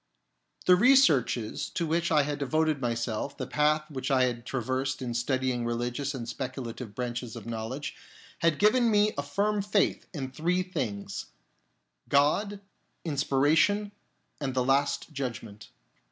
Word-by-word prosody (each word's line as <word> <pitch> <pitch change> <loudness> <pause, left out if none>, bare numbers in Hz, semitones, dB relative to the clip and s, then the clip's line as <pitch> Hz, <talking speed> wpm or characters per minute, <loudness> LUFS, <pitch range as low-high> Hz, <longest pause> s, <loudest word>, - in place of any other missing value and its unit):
The 180 - +7
researches 180 - +3
to 170 - -2
which 165 +2 0
I 150 -2 +5
had 145 0 -3
devoted 155 +1 +1
myself, 120 +2 -2
the - - -3
path 150 +1 +1
which 135 0 -3
I 130 -2 +4
had 120 -1 -2
traversed 130 +2 -2
in 125 -2 -3
studying 125 0 0
religious 120 +4 -2
and 120 -3 -5
speculative 125 -4 -6
branches 120 -1 -4
of - - -8
knowledge, 115 +5 -4 0.4
had 165 -3 +2
given 235 +3 +4
me 210 0 +4
a - - -1
firm 200 +9 0
faith 200 0 +1
in 135 -6 -5
three 175 +7 0
things 105 - -4 0.4
— - - -38
God, 200 +8 +1 0.4
Inspiration, 155 +8 +2 0.5
and 135 -3 -3
the 125 -1 +1
Last 140 +4 +1
Judgment. 115 -6 -6
140 Hz, 140 wpm, -28 LUFS, 120-165 Hz, 0.5 s, The